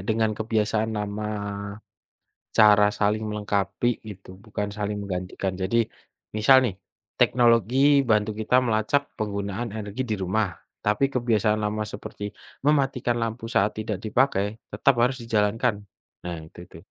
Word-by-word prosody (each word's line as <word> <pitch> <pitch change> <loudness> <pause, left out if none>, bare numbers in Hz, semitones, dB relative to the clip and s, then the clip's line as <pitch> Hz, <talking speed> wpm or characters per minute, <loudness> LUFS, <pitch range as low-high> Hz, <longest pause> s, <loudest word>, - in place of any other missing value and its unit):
dengan 110 0 +2
kebiasaan 110 0 0
lama, 105 +1 -3 1.3
cara 105 -1 +7
saling 105 +1 0
melengkapi 105 +1 -1 0.2
gitu, 95 -2 -11 0.2
bukan 105 -1 -3
saling 105 0 -2
menggantikan. 95 -1 -4
Jadi, 110 +5 +1 0.5
misal 130 +5 +6
nih, 100 -6 -3 0.4
teknologi 125 +4 +4
bantu 105 -2 +1
kita 125 +4 +3
melacak 115 +3 +1 0.2
penggunaan 100 +1 -3
energi 110 +4 -4
di 110 - -2
rumah, 95 0 0 0.3
tapi 105 +7 +2
kebiasaan 115 -4 +1
lama 105 +1 -2
seperti 105 -1 -6 0.3
mematikan 135 -4 +1
lampu 115 0 -3
saat 105 -3 +2
tidak 110 -2 -3
dipakai 110 -2 +1
tetap 140 - +3
harus 125 +2 +2
dijalankan. 110 +1 +1 0.5
Nah 90 -1 -5
itu 80 - -15
itu. - - -13
110 Hz, 130 wpm, -25 LUFS, 105-115 Hz, 1.3 s, cara